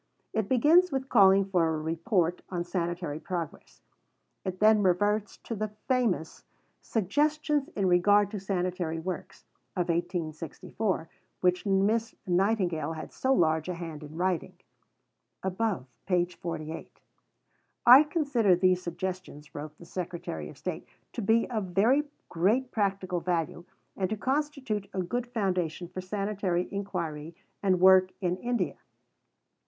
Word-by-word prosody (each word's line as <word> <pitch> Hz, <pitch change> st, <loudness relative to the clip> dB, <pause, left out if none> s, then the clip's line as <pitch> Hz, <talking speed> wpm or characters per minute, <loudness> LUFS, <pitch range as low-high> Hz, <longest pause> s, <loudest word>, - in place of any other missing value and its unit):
It 220 Hz, -2 st, -1 dB
begins 315 Hz, +8 st, +5 dB
with 265 Hz, 0 st, -2 dB
calling 195 Hz, -3 st, +6 dB
for 180 Hz, -4 st, +2 dB
a 160 Hz, -1 st, 0 dB
Report 165 Hz, +3 st, 0 dB
on 175 Hz, -2 st, -2 dB
Sanitary 175 Hz, -3 st, -3 dB
Progress. 170 Hz, -3 st, -6 dB, 0.6 s
It 185 Hz, -1 st, -4 dB
then 215 Hz, 0 st, +5 dB
reverts 205 Hz, +3 st, +1 dB
to -, -, -5 dB
the 215 Hz, 0 st, -2 dB, 0.2 s
famous 240 Hz, -11 st, 0 dB, 0.4 s
"Suggestions 295 Hz, -, 0 dB
in 200 Hz, -, 0 dB
regard 200 Hz, +3 st, +4 dB
to 210 Hz, -, -4 dB
Sanitary 180 Hz, -3 st, -2 dB
Works" 175 Hz, +1 st, -6 dB, 0.3 s
of 180 Hz, -1 st, -1 dB
1864, 170 Hz, +2 st, -2 dB, 0.3 s
which 180 Hz, +2 st, +2 dB
Miss 205 Hz, +4 st, +2 dB
Nightingale 180 Hz, -3 st, +1 dB
had 160 Hz, -, -8 dB
so 265 Hz, -, 0 dB
large 160 Hz, -, +2 dB
a 180 Hz, -, -2 dB
hand 165 Hz, -3 st, -7 dB
in 150 Hz, +1 st, -10 dB
writing 180 Hz, -2 st, -1 dB, 0.9 s
(above, 190 Hz, -, -1 dB, 0.2 s
p. 180 Hz, -2 st, +3 dB
48). 165 Hz, -2 st, -7 dB, 0.9 s
"I 250 Hz, +4 st, +11 dB
consider 285 Hz, -, +2 dB
these 185 Hz, 0 st, +3 dB
Suggestions," 175 Hz, -4 st, -6 dB
wrote 150 Hz, +1 st, -7 dB
the 170 Hz, -, -13 dB
Secretary 170 Hz, -, -5 dB
of -, -, -13 dB
State, -, -, -5 dB, 0.3 s
"to -, -, -3 dB
be 225 Hz, +3 st, +3 dB
of 215 Hz, -4 st, -1 dB
very 260 Hz, +9 st, +4 dB, 0.2 s
great 220 Hz, +10 st, +1 dB
practical 195 Hz, -4 st, 0 dB
value 170 Hz, 0 st, -2 dB, 0.3 s
and 185 Hz, -2 st, -1 dB
to 220 Hz, -, -2 dB
constitute 265 Hz, -5 st, -2 dB
a 185 Hz, -, 0 dB
good 245 Hz, +7 st, -2 dB
foundation 185 Hz, -7 st, -1 dB
for 185 Hz, +1 st, -6 dB
sanitary 195 Hz, -2 st, -1 dB
inquiry 170 Hz, -6 st, -4 dB, 0.3 s
and 185 Hz, -2 st, +2 dB
work 185 Hz, 0 st, +7 dB
in 180 Hz, -1 st, 0 dB
India." 210 Hz, -, -1 dB
185 Hz, 135 wpm, -29 LUFS, 175-215 Hz, 0.9 s, I